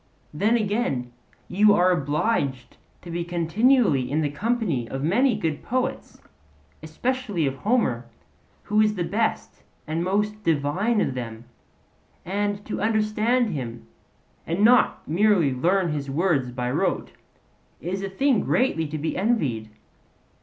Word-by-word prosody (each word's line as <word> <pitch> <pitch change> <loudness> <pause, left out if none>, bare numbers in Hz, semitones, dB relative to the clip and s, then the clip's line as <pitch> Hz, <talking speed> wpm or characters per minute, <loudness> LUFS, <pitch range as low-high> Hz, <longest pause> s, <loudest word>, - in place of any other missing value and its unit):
Then, 215 +10 +2
again, 205 - -1 0.4
you 205 +2 +4
are 185 -1 +4
obliged 145 - -1 0.3
to 175 - -8
be 170 +1 -2
continually 175 - +2
in 155 +3 0
the 145 -2 -1
company 185 - -1
of 135 +1 -4
many 235 - +3
good 160 -8 -2
poets; 255 +2 -3
and - - -24 0.6
especially 205 - -2
of 135 -1 -2
Homer, 135 - 0 0.6
who 210 +1 +2
is 215 0 +2
the 180 - -1
best 215 +6 -2 0.2
and 160 +2 -2
most 210 +3 -1
divine 165 +8 +1
of - - 0
them; 115 -2 -6 0.8
and 205 +2 -2
to 210 - -4
understand 215 +2 +1
him, 120 -7 -6 0.6
and 170 +5 0
not 245 +2 +3
merely 175 -4 +3
learn 175 +6 +1
his 145 -2 -4
words 145 -3 +1
by 125 0 -3
rote, - - -1 0.7
is 185 +3 -4
a 195 - -3
thing 255 +5 +2
greatly 165 -11 +1
to 155 +1 -5
be 155 +2 -3
envied. 150 - 0
180 Hz, 140 wpm, -24 LUFS, 145-215 Hz, 0.8 s, you